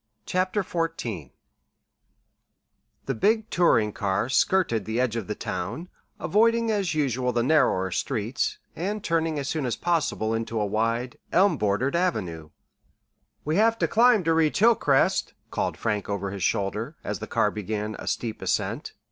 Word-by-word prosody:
CHAPTER 185 +2 0
XIV 165 - -3 1.8
The 135 - -1
big 220 - +1
touring 115 - +3
car 100 +3 -1
skirted 130 - +2
the 110 +2 -2
edge 125 -3 +1
of 110 -5 -3
the - - -3
town, 175 +4 -4 0.3
avoiding 230 +2 +2
as 200 -6 0
usual 130 -4 0
the 120 -1 0
narrower 120 - +2
streets, 115 +9 -1 0.2
and 200 +4 -3
turning 165 -2 0
as 140 -1 -3
soon 155 -3 -1
as 125 -3 -1
possible 155 -10 0
into 115 0 -2
a 105 - +1
wide, 115 +4 -1
elm 190 0 +4
bordered 105 +5 0
avenue. 90 - -1 1.0
"We 155 +3 0
have 225 +2 +4
to - - +1
climb 235 -3 +4
to 165 0 +2
reach 160 -2 +2
Hilcrest," 205 -11 +3 0.2
called - - -2
Frank 105 -3 -2
over 100 -1 -2
his 100 -3 -5
shoulder, 100 +2 -1
as - - -3
the - - -6
car - - +1
began 105 +1 -4
a - - -8
steep 115 -2 -3
ascent. - - -2
130 Hz, 155 wpm, -26 LUFS, 110-180 Hz, 1.8 s, elm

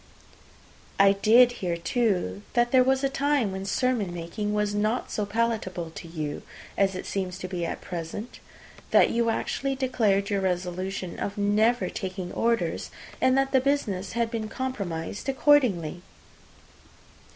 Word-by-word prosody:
"I 195 0 +7
did 225 +5 +5
hear, 175 -2 -1
too, 180 - 0
that 240 0 +2
there 255 -1 +6
was 265 +1 +2
a - - +4
time 275 -5 +1
when 190 0 -5
sermon 225 -2 0
making 175 +5 -4
was 210 0 0
not 215 +4 -1
so 210 -1 -2
palatable 205 -6 -1
to 170 - -9
you 155 -3 -4 0.3
as 195 -1 +2
it 185 - -5
seems 185 -2 -3
to 185 - -5
be 175 -2 -3
at - - -5
present; 175 +6 -6 0.5
that - - +5
you 235 0 +1
actually 270 +4 -1
declared 220 -6 +1
your 200 -1 +1
resolution 185 0 -3
of 200 - -3
never 215 +4 +2
taking 185 -2 -5
orders, 230 -8 0 0.3
and 260 0 +4
that 270 0 +2
the 265 - +4
business 220 -9 -1
had 230 -1 0
been 220 -2 -3
compromised 200 -5 -4
accordingly." 245 - +3
205 Hz, 150 wpm, -26 LUFS, 185-245 Hz, 0.5 s, I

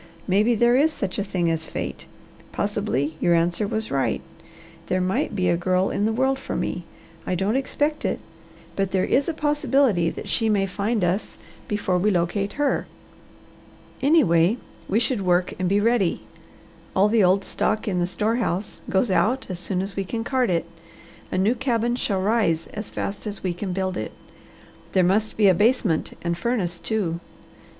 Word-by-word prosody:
Maybe 210 +5 +3
there 240 +2 +4
is 300 +5 +4
such 195 -11 -3
a - - +1
thing 175 -4 0
as 160 0 -2
fate. - - -5 0.4
Possibly 200 -8 -1
your 175 - +3
answer 170 +5 +1
was 220 0 -3
right. 135 -1 0 0.7
There 185 - +1
might 185 +3 0
be 185 -2 +1
a 175 - +3
girl 185 +2 +1
in 205 - 0
the 220 - +2
world 265 +3 +1
for - - -5
me. 175 - -3 0.4
I 185 - 0
don't 195 +6 0
expect 290 +3 -1
it, - - -1 0.6
but 195 -1 0
there 190 -1 +1
is 280 +5 +2
a - - -1
possibility 275 - +2
that - - -7
she 225 -1 +1
may 200 -2 +2
find 205 +2 -1
us 180 +4 -1 0.3
before 190 -3 0
we 205 +4 +2
locate 195 +2 0
her. 290 -1 0 1.1
Anyway, 225 - +4 0.3
we 210 - +3
should 240 -2 0
work 180 -1 +2
and 185 -1 0
be 200 +1 +3
ready. 215 -4 +2 0.7
All 195 +2 +5
the 220 -1 +3
old 190 +2 +4
stock 215 +3 -1
in 185 -3 0
the 175 - +1
store 215 +5 0
house 200 -4 -2
goes 195 +3 +2
out 245 +7 +2
as 175 - -3
soon 180 +1 -1
as 195 0 -6
we 195 - -1
can 225 +4 -3
cart 255 0 +1
it. 170 -2 +1 0.7
A - - -1
new 200 +5 +3
cabin 240 -2 0
shall 200 -6 -1
rise 190 -6 +1
as 210 0 -5
fast 200 +2 -4
as 205 -1 -6
we 185 -2 0
can 185 +2 -4
build 185 0 -1
it. - - -4 0.8
There 185 - +4
must 210 +5 +1
be 210 -2 +5
a 190 - +7
basement 210 -3 +1
and 170 0 0
furnace, 180 -3 -1
too. 185 -7 -1
200 Hz, 185 wpm, -24 LUFS, 180-230 Hz, 1.1 s, a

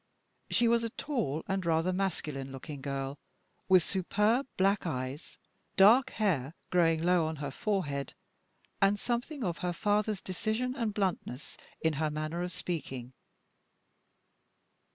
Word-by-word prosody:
She 235 - +3
was 235 0 +3
a 230 - -1
tall 220 - -2
and 190 -1 -1
rather 165 +2 +2
masculine 150 -8 -2
looking 135 +1 -7
girl, 135 0 -3 0.5
with 185 -2 +7
superb 210 +8 +1
black 195 0 +2
eyes, 130 0 -4 0.4
dark 235 +7 +7
hair 165 - 0 0.2
growing 165 -2 +3
low 175 -2 +3
on 160 - -3
her 140 -2 -4
forehead, 145 -6 -2 0.7
and 195 +1 +4
something 245 +5 -2
of 175 -4 -2
her 180 -1 -1
father's 210 +2 0
decision 220 +6 -1
and 230 -5 -1
bluntness 185 - -2 0.3
in 160 -1 +2
her 155 - +2
manner 155 +3 -3
of 180 0 -2
speaking. 140 -8 -5
180 Hz, 135 wpm, -31 LUFS, 150-210 Hz, 0.7 s, with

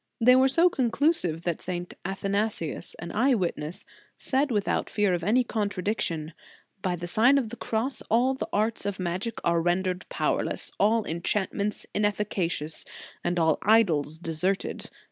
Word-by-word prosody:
They 250 +2 +7
were 260 +1 +5
so 330 +7 +5
conclusive 255 - +1
that 170 -2 -2
St. 175 0 -4
Athana 195 +3 0
sius, 160 -7 -5
an 170 - -7
eye 255 +5 +3
witness, 170 -4 -3 0.3
said 280 +2 0
without 210 -5 0
fear 205 -3 +2
of 175 -1 -1
any 235 +7 +3
contradiction: 200 -7 -2 0.2
" 195 - -36
By 185 -2 0
the 175 0 -6
Sign 230 +10 +4
of 250 -5 0
the 240 - -7
Cross 235 +3 -2
all 245 +4 +3
the 265 - -5
arts 215 0 0
of 200 -2 -2
magic 185 +6 -2
are 170 -1 +2
rendered 180 +1 0
powerless, - - -1
all 220 +2 +3
enchantments 200 +4 -2
inefficacious; 200 -7 -1 0.4
and 175 +1 0
all 160 -2 +3
idols 165 -9 +3
deserted. 175 +4 -2
200 Hz, 155 wpm, -27 LUFS, 175-230 Hz, 0.4 s, They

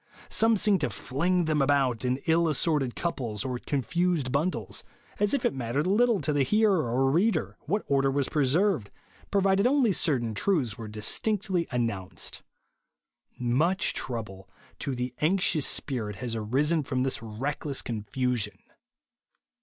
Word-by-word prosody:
Some 225 0 +4
seem 200 -1 +3
to - - 0
fling 175 +6 0
them 155 -2 +1
about 135 -4 +2
in 125 0 +1
ill 165 0 +3
as 150 - 0
sorted 145 -7 +1
couples, 120 - -3
or 125 -2 -3
confused 145 - -1
bundles, 155 +7 -1 0.4
as 205 0 +2
if - - -2
it - - +2
mattered 130 +3 -2
little 220 +3 +3
to 150 - 0
the 145 - +2
hearer 195 - +2
or 135 +3 +2
reader 200 +9 +1
what 205 +1 0
order 135 -1 +2
was 135 0 0
preserved, 150 - +1 0.4
provided 195 +2 +3
only 255 -6 +3
certain 125 -10 0
truths 130 - 0
were 115 -3 -8
distinctly 180 - 0
announced. 100 -8 -3 1.0
Much 150 +11 +1
trouble 105 -7 -5 0.3
to 135 - -2
the 125 0 -3
anxious 165 -2 +2
spirit 110 -7 -1
has 115 +3 -4
arisen 140 +9 +1
from 130 -2 -1
this 135 -3 -1
reckless 135 +5 -3
confusion. 120 -1 -2
140 Hz, 145 wpm, -27 LUFS, 120-180 Hz, 1.0 s, Some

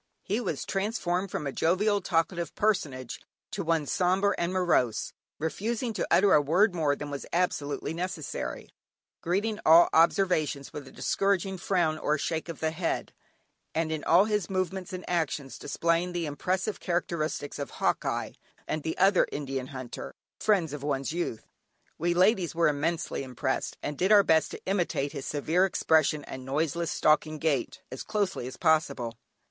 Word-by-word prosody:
He 210 +4 -1
was 160 - -3
transformed 195 -2 -1
from 150 - -4
a 140 - -2
jovial, 200 +7 +2
talkative 170 0 -1
personage, 140 - -1 0.3
to - - -3
one 165 -2 +1
sombre 190 +5 +2
and 170 +1 -1
morose, 175 - +1 0.2
refusing 220 - -2
to - - -2
utter 190 +3 +5
a 150 - +6
word 180 +8 +3
more 155 -4 +1
than 145 0 -6
was 140 - -5
absolutely 160 -4 -1
necessary, 170 -3 -4 0.5
greeting 205 +5 -1
all 165 +2 +7
observations 160 -4 +2
with 145 -2 -7
a - - -12
discouraging 195 -1 0
frown 170 -4 +1
or 150 - +1
a - - -2
shake 160 +2 -3
of 165 - -7
the 160 0 +1
head, 165 +1 -2 0.6
and, 160 0 0
in 155 -1 -3
all 175 +5 +5
his 210 -5 -1
movements 185 0 -2
and 185 -1 -7
actions 155 -5 -2
displaying 170 +2 0
the 175 -1 -1
impressive 185 +8 -2
characteristics 165 -5 -2
of 140 - -4
"Hawkeye," - - -1 0.4
and 155 -1 -2
other 195 -1 +4
Indian 135 -3 -3
Hunter 130 -3 -7 0.2
friends 185 -8 +2
of 150 - -5
one's 140 0 -2
youth. 170 -10 -3 0.5
We 175 +1 +1
ladies 185 -2 +3
were 165 -2 +4
immensely 155 +3 -1
impressed, 130 +1 -3
and 145 -1 -4
did 190 +3 +2
our 205 -1 +8
best 160 -3 +3
to - - -9
imitate 175 -7 0
his 135 - -6
severe 160 +5 +1
expression 155 -5 +2
and 130 -1 -8
noiseless, 160 +5 -1
stalking 155 0 +2
gait, 150 -5 -1
as 130 - -6
closely 200 - -1
as 130 - -8
possible. 140 -8 +1
165 Hz, 160 wpm, -28 LUFS, 145-185 Hz, 0.6 s, our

